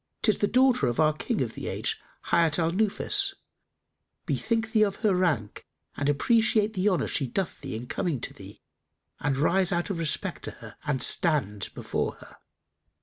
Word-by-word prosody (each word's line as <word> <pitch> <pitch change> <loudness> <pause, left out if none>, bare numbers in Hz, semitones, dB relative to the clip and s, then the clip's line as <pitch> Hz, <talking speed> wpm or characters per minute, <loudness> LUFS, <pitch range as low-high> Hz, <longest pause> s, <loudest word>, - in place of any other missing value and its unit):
'Tis 215 - +2
the 205 - +2
daughter 255 +1 +3
of 120 - -2
our 155 -1 +4
King 215 +8 -2
of 115 -3 -5
the - - -6
age, - - -2 0.3
Hayat 165 -3 +4
al 165 -1 +1
Nufus: 390 - +2 0.9
bethink 225 -1 -1
thee 220 -3 +3
of 200 -2 +2
her 205 - +4
rank 155 - -1 0.3
and 140 0 -1
appreciate 220 - +2
the 195 +1 +2
honour 185 - +1
she 135 - 0
doth 185 +7 -3
thee - - -5
in 115 +2 -5
coming 145 +2 -2
to - - -4
thee - - -13 0.6
and 135 -2 0
rise 185 +6 +2
out 175 +2 -1
of 175 - -3
respect 160 -2 -2
for - - -5
her - - -12
and 135 -4 +1
stand 105 - +2
before - - -2
her." - - -16
175 Hz, 180 wpm, -27 LUFS, 145-215 Hz, 0.9 s, our